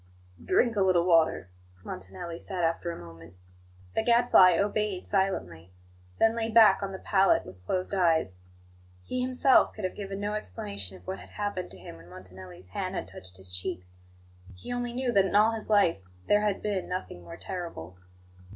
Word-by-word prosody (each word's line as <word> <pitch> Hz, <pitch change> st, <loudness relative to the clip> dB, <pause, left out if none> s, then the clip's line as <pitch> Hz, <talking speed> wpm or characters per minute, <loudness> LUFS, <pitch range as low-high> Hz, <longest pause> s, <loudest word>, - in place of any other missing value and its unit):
"Drink 230 Hz, -, +2 dB
a 200 Hz, -, +1 dB
little 185 Hz, -3 st, +3 dB
water," 165 Hz, -, +2 dB, 0.3 s
Montanelli 95 Hz, -, -7 dB
said 185 Hz, -3 st, -4 dB
after 165 Hz, +1 st, 0 dB
a 170 Hz, -, -5 dB
moment. 85 Hz, +1 st, -13 dB, 0.6 s
The -, -, +1 dB
Gadfly 235 Hz, -7 st, +5 dB
obeyed 205 Hz, -1 st, -1 dB
silently; 90 Hz, -, -2 dB, 0.4 s
then 225 Hz, 0 st, +3 dB
lay 225 Hz, -1 st, -2 dB
back 220 Hz, -3 st, +6 dB
on 195 Hz, -1 st, -3 dB
the 190 Hz, -, -6 dB
pallet 195 Hz, -, +2 dB
with 90 Hz, 0 st, -13 dB
closed 185 Hz, +1 st, -2 dB
eyes. 165 Hz, -, +1 dB, 0.6 s
He 255 Hz, -, -3 dB
himself 255 Hz, +1 st, +3 dB
could 215 Hz, -, -8 dB
have 185 Hz, -, -2 dB
given 195 Hz, -1 st, -6 dB
no 205 Hz, +1 st, -2 dB
explanation 100 Hz, -, -5 dB
of 90 Hz, -, -20 dB
what 95 Hz, +2 st, -5 dB
had -, -, -13 dB
happened 205 Hz, -3 st, -4 dB
to 95 Hz, -, -12 dB
him 85 Hz, -2 st, -11 dB
when 85 Hz, +1 st, -16 dB
Montanelli's 90 Hz, 0 st, -12 dB
hand -, -, -4 dB
had -, -, -4 dB
touched 95 Hz, 0 st, -11 dB
his 95 Hz, -1 st, -7 dB
cheek; 90 Hz, 0 st, -3 dB, 0.7 s
he 90 Hz, -, -7 dB
only 245 Hz, 0 st, -3 dB
knew 250 Hz, 0 st, -1 dB
that 195 Hz, -4 st, +4 dB
in 195 Hz, -, -2 dB
all 215 Hz, +2 st, +5 dB
his 225 Hz, -1 st, -6 dB
life 200 Hz, -, +3 dB, 0.3 s
there 205 Hz, 0 st, +4 dB
had 210 Hz, -2 st, -1 dB
been 205 Hz, -3 st, -2 dB
nothing 180 Hz, -, -5 dB
more 85 Hz, -1 st, -10 dB
terrible. 165 Hz, -, -7 dB
180 Hz, 180 wpm, -28 LUFS, -, 0.7 s, back